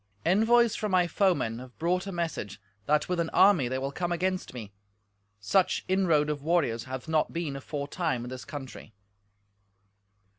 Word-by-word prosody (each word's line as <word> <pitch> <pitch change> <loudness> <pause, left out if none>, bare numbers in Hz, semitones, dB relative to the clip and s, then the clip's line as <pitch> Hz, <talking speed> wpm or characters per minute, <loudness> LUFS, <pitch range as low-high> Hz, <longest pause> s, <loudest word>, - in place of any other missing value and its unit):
Envoys 225 +6 +4
from 210 -2 -2
my 180 -1 +4
foemen 170 - +1
have 125 -1 -12
brought 180 +3 0
a - - -4
message 165 - -4 0.3
that 150 +1 +2
with 180 -1 -1
an 165 -1 0
army 185 -10 +5
they 130 +2 -2
will 135 +1 -3
come 175 +4 -3
against 185 +2 -1
me; 110 -5 -9 0.7
such 180 - +1
inroad 175 -6 +2
of 150 -2 -3
warriors 140 -8 0
hath 130 +1 -6
not 160 -1 +1
been 165 -5 -3
aforetime 140 -1 -3
in 120 - -6
this 130 0 -7
country." 135 -6 -9
160 Hz, 160 wpm, -28 LUFS, 130-180 Hz, 0.7 s, army